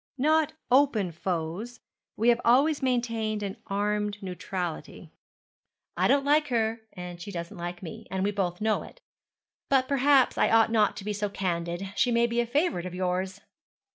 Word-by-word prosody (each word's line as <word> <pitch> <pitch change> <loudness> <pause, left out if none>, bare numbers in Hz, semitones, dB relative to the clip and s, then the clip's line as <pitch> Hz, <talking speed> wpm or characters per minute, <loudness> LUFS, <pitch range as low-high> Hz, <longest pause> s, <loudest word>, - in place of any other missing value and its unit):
'Not 310 +3 +2 0.2
open 245 -9 +3
foes; 175 +7 -4 0.4
we 230 +3 +3
have 240 0 +3
always 280 +6 +4
maintained 230 -4 -1
an 200 +2 -4
armed 210 +1 -1
neutrality. 180 -2 -5 0.8
I - - +2
don't 275 0 +3
like 300 +1 +3
her, 225 -2 0
and 180 -2 -8
she 200 - -7
doesn't 170 -2 -6
like 175 +1 -6
me, 165 - -8
and 190 0 -2
we 205 - +1
both 185 -3 -2
know 220 0 +1
it. - - -12 0.7
But 265 -2 +3
perhaps 275 -1 +3
I - - +4
ought 225 0 +4
not 215 -2 +2
to 195 - -7
be 210 - -1
so 205 0 -2
candid. 175 0 -3
She 245 - +2
may 235 0 +3
be 235 0 -1
a 240 - +1
favourite 245 - 0
of 180 - -7
yours.' 185 +1 -2
210 Hz, 170 wpm, -27 LUFS, 185-245 Hz, 0.8 s, always